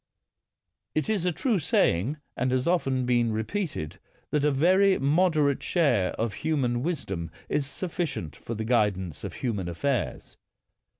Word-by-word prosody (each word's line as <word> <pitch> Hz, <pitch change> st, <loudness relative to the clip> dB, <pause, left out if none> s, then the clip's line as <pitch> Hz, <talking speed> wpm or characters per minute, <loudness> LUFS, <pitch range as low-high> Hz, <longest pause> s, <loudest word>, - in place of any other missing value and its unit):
It 155 Hz, +6 st, 0 dB
is 190 Hz, -5 st, 0 dB
a -, -, +3 dB
true 220 Hz, -, +1 dB
saying, 125 Hz, -, +2 dB, 0.2 s
and 130 Hz, +1 st, 0 dB
has 130 Hz, 0 st, +1 dB
often 135 Hz, -8 st, +1 dB
been 120 Hz, -2 st, +2 dB
re 110 Hz, 0 st, -1 dB
peated, 160 Hz, -, -4 dB, 0.3 s
that 150 Hz, -1 st, +1 dB
a 150 Hz, -, +4 dB
very 185 Hz, +7 st, +4 dB
moderate 150 Hz, -1 st, +2 dB
share 125 Hz, -, +2 dB
of 115 Hz, -2 st, -2 dB
human 130 Hz, -7 st, 0 dB
wisdom 100 Hz, -, -3 dB, 0.2 s
is 145 Hz, -2 st, 0 dB
sufficient 160 Hz, -, -4 dB
for 115 Hz, -, -6 dB
the 110 Hz, +1 st, -3 dB
guidance 100 Hz, -, 0 dB
of -, -, -5 dB
human 105 Hz, -8 st, -2 dB
affairs. 130 Hz, +9 st, -2 dB
135 Hz, 145 wpm, -27 LUFS, 110-160 Hz, 0.3 s, a